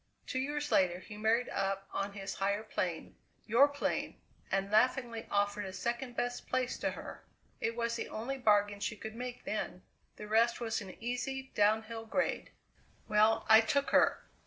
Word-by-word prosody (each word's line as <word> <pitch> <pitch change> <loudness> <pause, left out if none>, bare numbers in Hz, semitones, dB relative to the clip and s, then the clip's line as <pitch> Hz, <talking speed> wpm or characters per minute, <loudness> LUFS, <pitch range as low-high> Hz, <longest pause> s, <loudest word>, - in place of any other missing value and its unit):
Two 260 - -2
years 295 +2 -2
later 180 -2 +3
he 185 +3 -10
married 220 +3 +2
up 195 0 -2
on 200 0 -2
his 200 -1 -5
higher 200 +2 0
plane 180 -6 -3 0.3
your 240 +6 +6
plane 285 0 -2 0.3
and 195 +1 0
laughingly 235 0 +2
offered 205 0 +1
a 190 - -5
second 240 +4 -3
best 245 0 -2
place 255 0 0
to - - 0
her. - - -8 0.4
It 230 - -1
was 235 0 -1
the - - -4
only 260 +5 -4
bargain 205 -3 +3
she 205 +2 -2
could 220 +2 -7
make 245 +1 -6
then! - - -3 0.3
The 210 - -8
rest 230 +2 +3
was 230 -1 -2
an 190 -3 -9
easy 265 +2 -3
downhill 220 +2 +1
grade. 275 - -1 0.6
"Well, 215 +1 +4
I 220 0 +9
took 280 +5 0
her. - - +4
225 Hz, 170 wpm, -33 LUFS, 205-245 Hz, 0.6 s, I